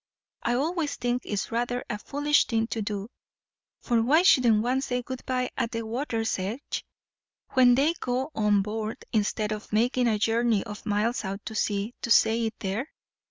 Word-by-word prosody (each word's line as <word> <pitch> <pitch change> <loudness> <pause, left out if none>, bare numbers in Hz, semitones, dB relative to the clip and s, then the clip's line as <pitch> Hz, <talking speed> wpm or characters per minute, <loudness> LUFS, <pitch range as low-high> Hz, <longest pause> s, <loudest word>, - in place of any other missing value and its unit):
I 240 - 0
always 310 +3 -1
think 245 0 -1
it's 205 -2 -3
rather 245 +2 -1
a 210 - -4
foolish 290 +4 +2
thing 225 -2 +1
to 225 - -2
do, 205 -1 -3 0.7
for 235 -2 +2
why 300 +9 +4
shouldn't 240 - +5
one 255 +2 +1
say 250 -2 -2
good 260 +1 -6
bye 255 -1 -1
at 230 - -1
the 230 -1 -3
water's 225 -3 -2
edge, 215 +9 -4 0.7
when 250 -2 +6
they 290 +6 +3
go 255 +4 -2
on 210 -4 +2
board, 215 +1 -4
instead 215 0 0
of 215 0 -5
making 245 +3 +2
a 220 -2 +2
journey 225 0 +2
of 210 -1 -9
miles 215 +4 0
out 195 +1 -5
to 220 - -5
sea 210 +1 -1
to - - -4
say 225 0 +4
it 220 - -6
there? 205 +8 -2
230 Hz, 180 wpm, -27 LUFS, 215-250 Hz, 0.7 s, when